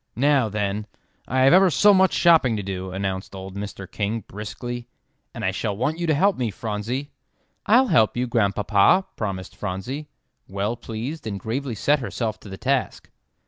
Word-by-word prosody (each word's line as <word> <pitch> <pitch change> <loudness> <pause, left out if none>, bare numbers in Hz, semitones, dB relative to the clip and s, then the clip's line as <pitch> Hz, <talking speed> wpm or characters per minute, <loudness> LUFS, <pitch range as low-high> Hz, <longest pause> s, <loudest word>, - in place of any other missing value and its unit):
"Now, 135 -1 +3
then, 105 0 -2 0.4
I 130 +2 +1
have 135 +1 +6
ever 190 +1 +7
so 205 +5 +5
much 190 -1 +4
shopping 160 -10 +4
to 100 - -3
do," 95 -1 -4
announced 95 0 -4
old 95 0 -8
Mr. 100 -1 -6
King, 105 +4 -3
briskly, 120 +5 -7 0.4
"and - - -5
I - - +2
shall 100 - -3
want 150 +8 -1
you 170 - -1
to 155 - +3
help 195 +6 +3
me, 120 -3 -1
Phronsie." 115 +7 -4 0.6
"I'll 245 +5 +6
help 110 0 +3
you, 125 - +1
Grandpapa," 105 - +3
promised 95 -3 -4
Phronsie, 105 +10 -5 0.4
well 100 +4 -2
pleased, 120 +5 -6
and 100 -2 -4
gravely 120 +4 -3
set 145 +8 +2
herself 115 -3 -3
to 105 - -12
the 95 - -7
task. 135 +2 -1
115 Hz, 175 wpm, -23 LUFS, 100-140 Hz, 0.6 s, ever